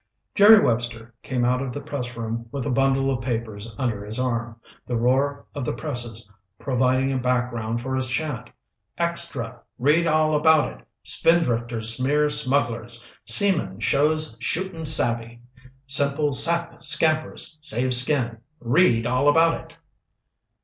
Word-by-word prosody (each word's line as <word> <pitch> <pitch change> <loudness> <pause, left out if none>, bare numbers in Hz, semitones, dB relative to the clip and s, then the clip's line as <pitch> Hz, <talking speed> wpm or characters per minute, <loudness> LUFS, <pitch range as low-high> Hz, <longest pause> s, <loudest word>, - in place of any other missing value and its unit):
Jerry 210 +2 +7
Webster 115 - -2
came 125 -2 -2
out 125 +1 0
of 135 -2 -4
the 145 - -5
pressroom 120 -5 -6
with 135 -1 -5
a 145 - -2
bundle 135 +1 +1
of 125 -2 -3
papers 115 -3 -5
under 115 -6 -3
his 105 +2 -2
arm, 115 -2 -3 0.3
the 120 - -3
roar 135 +4 0
of 145 - -5
the - - -3
presses 120 -3 -5 0.3
providing 130 +1 0
a 130 - -1
background 120 -2 -2
for 130 +2 -4
his 130 0 0
chant. 145 0 -4 0.5
"Extra! 170 -8 -3 0.2
Read 150 +7 +2
All 155 -1 +2
About 155 0 +3
It! - - -26 0.2
Spindrifters 120 -8 +1
Smear 145 +4 +1
Smugglers! 120 -5 -1 0.2
Seaman 190 - +3
Shows 150 +2 0
Shootin' 165 +2 -3
Savvy! 120 -5 +2 0.5
Simple 140 +2 +3
Sap 170 +5 +1
Scampers, 155 +1 +1
Saves 125 -3 +5
Skin! 125 -4 -1 0.2
Read 120 -2 +2
All 125 +4 +2
About 165 +2 +4
It!" 165 0 -19
130 Hz, 135 wpm, -23 LUFS, 120-150 Hz, 0.5 s, Jerry